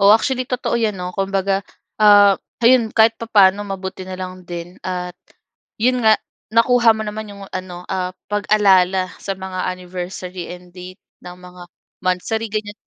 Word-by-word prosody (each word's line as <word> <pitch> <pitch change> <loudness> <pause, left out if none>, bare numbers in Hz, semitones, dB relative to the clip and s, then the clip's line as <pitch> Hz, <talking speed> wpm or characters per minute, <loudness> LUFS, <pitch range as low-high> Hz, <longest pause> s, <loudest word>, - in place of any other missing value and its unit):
O, 200 +1 +6
actually 255 +4 +3
totoo 250 -1 -2
'yan, 220 -4 0
'no? 180 0 -5
Kumbaga, 195 0 0 0.4
ah, 205 -1 +7 0.3
ayun 235 -2 +5
kahit 225 0 +5
papano, 205 -3 +4
mabuti 190 -1 -6
na 185 0 -7
lang 185 0 -7
din 175 0 -7
at 180 -1 -4 0.7
'yon 250 +2 +2
nga 220 -1 +6 0.3
nakuha 230 0 +4
mo 220 - -3
naman 215 +1 -5
'yong 200 -1 -10
ano, 180 -1 -6
ah, 185 -1 -2 0.2
pag-alala 190 -3 +3
sa 195 -1 -4
mga 185 -1 -4
anniversary 180 0 -7
and 180 0 -13
date 185 +1 -11 0.2
ng 180 0 -10
mga 180 0 -13 0.4
monthsary, 185 +5 -1
ganyan. 210 -1 -3
195 Hz, 155 wpm, -19 LUFS, 185-215 Hz, 0.7 s, ah